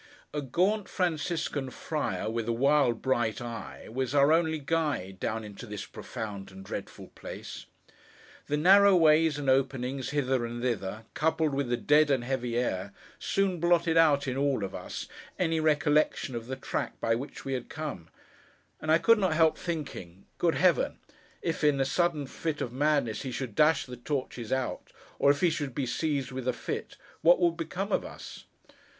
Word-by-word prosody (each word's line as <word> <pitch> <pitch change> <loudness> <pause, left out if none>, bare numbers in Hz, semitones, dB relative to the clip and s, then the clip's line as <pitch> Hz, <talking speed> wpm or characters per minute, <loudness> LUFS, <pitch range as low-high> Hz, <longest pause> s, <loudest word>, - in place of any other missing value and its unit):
A 150 - -1
gaunt 185 - 0
Franciscan 160 -5 -1
friar, 130 - -3
with 115 0 -2
a - - +1
wild 135 -1 +2
bright 120 -5 +1
eye, 120 -1 -7
was 130 +3 -2
our 140 +2 +6
only 160 -1 +2
guide, 145 - -2
down 110 +3 -2
into 105 -2 -9
this 105 -1 -6
profound 105 -5 -7
and 95 0 -12
dreadful - - -7
place. - - -9 0.8
The 150 - 0
narrow 195 +4 +7
ways 160 -2 +5
and 145 -2 -4
openings 130 0 +1
hither 135 -4 0
and 120 0 -4
thither, 110 -3 -2
coupled 160 -1 +1
with 135 -2 -1
the 120 - +1
dead 150 +3 +4
and 135 -4 +2
heavy 125 -2 -2
air, 100 -5 -1 0.3
soon 195 -3 0
blotted 170 -1 +3
out, 150 -4 +4
in 130 0 -2
all 140 -6 +1
of 95 - -4
us, - - -6 0.3
any 165 -2 +1
recollection 150 -3 +2
of 115 -1 -5
the 130 - -3
track 130 - -4
by 115 - +1
which 130 +6 -5
we 135 - -2
had 125 -2 -4
come: 150 - -6 0.7
and 155 - 0
I 160 - +7
could 230 +5 +4
not 185 -5 +1
help 160 -1 +4
thinking 135 - -6
'Good 170 -2 +2
Heaven, 180 -2 +2 0.5
if, 165 -2 -2
in 145 -2 +4
a 135 - +2
sudden 160 0 +1
fit 155 +3 -4
of 120 - -3
madness, 140 -5 +1
he 130 - -4
should 125 -3 -4
dash 155 +7 +3
the 125 -1 -9
torches 125 -3 -4
out, 130 -1 -2 0.3
or 140 - +5
if 145 0 +3
he 175 - +4
should 145 -5 -3
be 140 - -1
seized 140 +1 -1
with 130 -1 -5
a 125 - +2
fit, - - -5 0.2
what 175 +2 +6
would 170 -2 +3
become 180 +5 -4
of - - +1
us! - - -10
140 Hz, 180 wpm, -29 LUFS, 120-160 Hz, 0.8 s, narrow